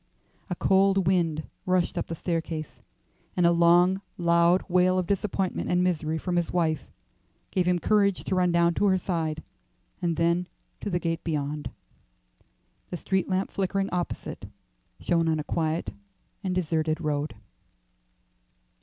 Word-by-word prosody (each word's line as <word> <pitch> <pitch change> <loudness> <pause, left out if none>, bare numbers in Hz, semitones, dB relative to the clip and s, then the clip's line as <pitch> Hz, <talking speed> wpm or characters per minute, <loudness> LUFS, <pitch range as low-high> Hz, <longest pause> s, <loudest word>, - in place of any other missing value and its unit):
A 180 - -1
cold 195 +1 +3
wind 165 -4 +1 0.2
rushed 185 0 +1
up 175 - -2
the 165 - -4
staircase, 165 -2 -4 0.6
and 175 - +4
a 170 - +6
long 175 +3 +4 0.2
loud 170 +1 +3
wail 185 0 +3
of 185 - +1
disappointment 195 0 -1
and 180 0 +2
misery 160 -3 0
from 175 +2 -2
his 175 - 0
wife 160 -3 0 0.6
gave 180 -2 +1
him 180 0 +3
courage 200 +1 +2
to - - -3
run 180 -1 +3
down 170 0 +3
to 205 - +1
her 190 -1 +4
side, 160 -4 -2 0.6
and 170 -2 0
then 170 +1 +1 0.3
to - - -4
the 175 - 0
gate 165 -1 -2
beyond. 150 -2 -2 1.2
The 175 - -4
street 190 +2 -1
lamp 190 +1 0
flickering 195 0 -1
opposite 180 -1 -4 0.5
shone 165 -1 +1
on 160 -1 +1
a - - -2
quiet 160 +1 -2 0.5
and 185 -2 -1
deserted 160 -2 0
road. 150 -4 -2
175 Hz, 145 wpm, -27 LUFS, 165-185 Hz, 1.2 s, a